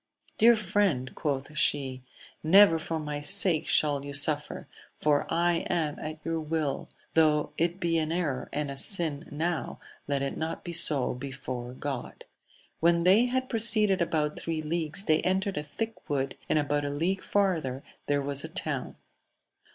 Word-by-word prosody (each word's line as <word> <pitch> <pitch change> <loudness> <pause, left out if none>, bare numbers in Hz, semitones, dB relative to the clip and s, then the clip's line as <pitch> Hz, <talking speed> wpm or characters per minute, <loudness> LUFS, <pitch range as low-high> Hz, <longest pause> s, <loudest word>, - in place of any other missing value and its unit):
Dear 235 +2 +7
friend, 190 - 0
quoth 145 -1 -3
she, 135 -3 +2 0.4
never 170 0 +6
for 160 0 -3
my 150 -1 -4
sake 160 +2 +2
shall 145 -2 +3
you 140 0 -7
suffer, 145 +1 +1 0.3
for 145 -1 +1
I 170 +1 +2
am 155 -4 -1
at 155 0 -7
your 165 0 -1
will: 155 -2 -2 0.3
though 155 -2 +3
it 170 +2 -1
be 170 -2 +1
an 155 0 -2
error 160 -7 -2
and 145 -1 -3
a 135 - -7
sin 160 -3 +1
now, 165 +3 -3 0.3
let 140 -1 0
it 140 - -3
not 160 +1 -4
be 175 - -6
so 150 -5 +3
before 125 -1 -6
God. 135 -2 -6 0.3
— - - -31
When 170 +1 +3
they 195 +7 +5
had 260 +1 -1
proceeded 215 -5 +3
about 155 -3 -1
three 160 -1 -3
leagues 165 +4 -3
they 155 -1 +3
entered 190 +2 0
a - - 0
thick 220 +10 -6
wood, 135 -2 -1
and - - +2
about 145 0 0
a 145 - -2
league 170 +7 -1
farther 165 -10 -1 0.2
there 145 -1 +1
was 140 0 0
a - - -6
town. - - -4
155 Hz, 165 wpm, -28 LUFS, 145-175 Hz, 0.4 s, Dear